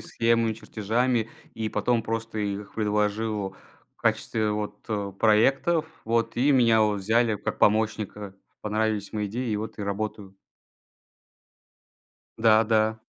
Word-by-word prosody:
схемами, 115 -1 +1
чертежами 115 +2 -1 0.3
и 110 -1 -2
потом 120 0 0
просто 115 0 -4
их 100 -1 -4
предложил 105 -1 -1 0.4
в - - -31
качестве 110 -2 0
вот, 105 0 -4
э, 100 -3 -2
проектов. 135 +9 +3 0.2
Вот. 115 +1 0
И 130 +4 +3
меня 115 -4 +4
вот 105 -2 +1
взяли 110 +2 +2
как - - -4
помощника. 105 -2 0 0.3
Понравились 105 -1 -1
мои 105 -1 -2
идеи, 120 +4 -3
и 105 - 0
вот 110 +2 -5
я 100 - -3
работаю. 100 -1 -4 2.0
Да, 110 0 +5
да. 110 0 +2
110 Hz, 130 wpm, -26 LUFS, 105-115 Hz, 2.0 s, Да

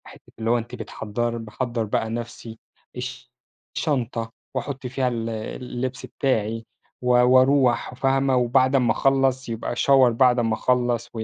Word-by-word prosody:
حتّة - - -16
اللي 115 0 -1
هو 120 - +4
أنتِ 120 +1 -6
بتحضّر 120 +1 -3
باحضّر 115 +1 -3
بقى 110 +1 -1
نَفسي، 115 -1 -6 0.4
الش 125 0 -7 0.4
الشنطة 120 -6 -1 0.2
وأحُط 130 0 -4
فيها 130 +1 -1
ال 115 -2 -2
اللبس 125 +3 -5
بتاعي 115 -4 -1 0.4
و 125 - -4
واروح، 130 +1 +4
فاهمة؟ 135 +1 +1
وبعد 130 +2 +3
امّا 125 -4 +3
اخلّص 135 -1 +1
يبقى 115 +1 -3
shower 135 0 +5
بعد 125 +1 +4
امّا 115 -2 +1
اخلّص 120 0 0
و 110 -1 -4
125 Hz, 145 wpm, -23 LUFS, 115-130 Hz, 0.4 s, shower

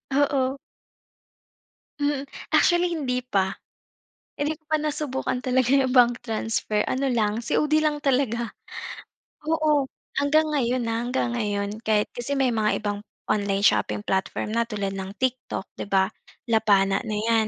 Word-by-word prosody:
Oo. 275 -1 +2 1.4
Mm, 285 -1 0 0.3
actually 350 0 +4
hindi 255 -5 -1
pa. 200 -7 -1 0.8
Hindi 295 +2 0
ko - - -41
pa 310 - +4
nasubukan 285 -4 -2
talaga 255 -1 +2
'yong 270 -2 +3
bank 245 -1 +5
transfer, 220 -1 -1
ano 270 +2 0
lang, 215 -2 +1
COD 300 +5 +1
lang 300 -1 +1
talaga. 250 -4 +1 1.0
Oo, 305 -4 +2 0.3
hanggang 310 +2 +3
ngayon, 255 -3 +1
ah, 225 0 0
hanggang 245 0 0
ngayon 205 -3 -1
kahit 215 -2 +2
kasi 240 +4 -2
may 265 -1 +3
mga 215 -1 +1
ibang 205 -1 -1 0.3
online 200 -1 0
shopping - - +2
platform 190 +2 -1
na 235 0 +2
tulad 205 -3 -2
ng 190 0 -5
TikTok, 260 -5 -1 0.2
'di - - -4
ba? 190 0 +3 0.4
Lapana 200 -3 +4
na 215 - -2
'yan. 220 +1 +2
245 Hz, 140 wpm, -25 LUFS, 210-280 Hz, 1.4 s, bank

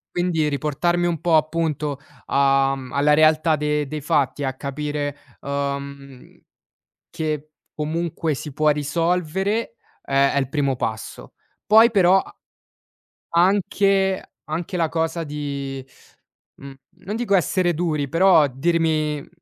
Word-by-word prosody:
Quindi 175 -4 +1
riportarmi 160 +5 0
un 165 -3 -2
po' 165 -1 +2
appunto 155 -2 0 0.3
a 135 0 +3
mhmm, 130 -1 -8
alla 145 +1 +3
realtà 155 +1 +4
de 150 0 0
dei 150 +2 -5
fatti 145 0 0
e - - 0
a 130 - -2
capire, 145 +2 -4 0.3
uhm, 140 -1 -5 0.7
che 155 -1 -4 0.2
comunque 160 +1 -2
si 150 +2 -5
può 155 +1 +3
risolvere, 175 - -1 0.3
è 140 0 +2
è - - +1
il 135 -2 -1
primo 140 -3 0
passo. 110 - -5 0.3
Poi 225 +2 +7
però, 190 -3 +4
a - - -15 1.0
anche 195 +1 +2 0.2
anche 165 +4 -4
la 165 -2 +1
cosa 165 +1 -2
di 140 -3 -5 0.7
mhmm, 140 0 -11 0.3
non 205 +4 -4
dico 225 -4 0
essere 180 -1 +2
duri, 155 -4 -1
però 165 -1 +5
dirmi, 155 +1 0
mhmm - - -14
155 Hz, 130 wpm, -22 LUFS, 140-175 Hz, 1.0 s, Poi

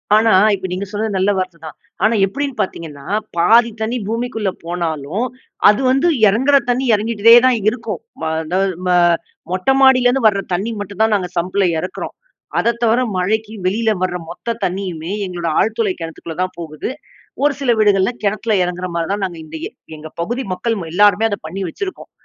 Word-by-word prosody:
ஆனா, 220 +1 +4 0.2
இப்ப 190 -1 -5
நீங்க 190 +2 -3
சொன்னது 210 -1 -2
நல்ல 190 +2 +2
வார்த்தை 185 -2 -3
தான். 155 - -8 0.3
ஆனா 220 +1 +4
எப்படின்னு 275 +7 -3
பார்த்தீங்கன்னா, 150 -6 -6 0.3
பாதி 230 +7 +5
தண்ணி 230 +3 -1
பூமிக்குள்ள 225 -3 -2 0.2
போனாலும், 170 - -2 0.4
அது 210 +5 +3
வந்து 270 +6 +2 0.2
இறங்குற 265 +8 +4
தண்ணி 255 +2 +1
இறங்கிட்டே 225 +2 +5
தான் 255 -2 +4
இருக்கும். 220 -5 -5 0.2
ம - - -5 0.2
அதாவது 185 +3 0
ம - - +1 0.6
மொட்டை 185 +9 +2
மாடியிலேருந்து 255 -1 +4
வர 200 -2 +2
தண்ணி 205 +6 -1
மட்டும் 205 +1 -5
தான் 220 -1 +3
நாங்க 180 -3 -2
சம்பில 185 +3 +1 0.2
இறக்குறோம். 180 - -6 0.4
அதை 235 - +2
தவிர 230 +2 +3 0.2
மழைக்கு 215 +4 -1
வெளியில 220 +4 +1
வர 185 -1 -1
மொத்த 230 +6 -4
தண்ணியுமே 180 -2 -4
எங்களோட 175 -3 -3
ஆழ்துளை 220 -3 0
கிணத்துக்குள்ள 165 0 -7
தான் 185 - -5
போகுது. 155 +4 -5 0.5
ஒரு 290 - +3
சில 275 - -2
வீடுகள்ல 205 +1 +3
கிணத்தில 215 +2 0
இறங்குற 180 +1 -3
மாரி 165 -1 -1
தான் 200 -1 -2
நாங்க 175 -3 -6
இந்த 160 +1 -10
எ - - -11 0.3
எங்க 155 +1 -9
பகுதி 240 +8 -2
மக்கள் 225 +6 -1
ம - - -5
எல்லாருமே 205 +2 +4
அத 205 - -2
பண்ணி 190 +4 -5
வச்சிருக்கோம். 375 - -7
205 Hz, 170 wpm, -18 LUFS, 180-230 Hz, 0.6 s, பாதி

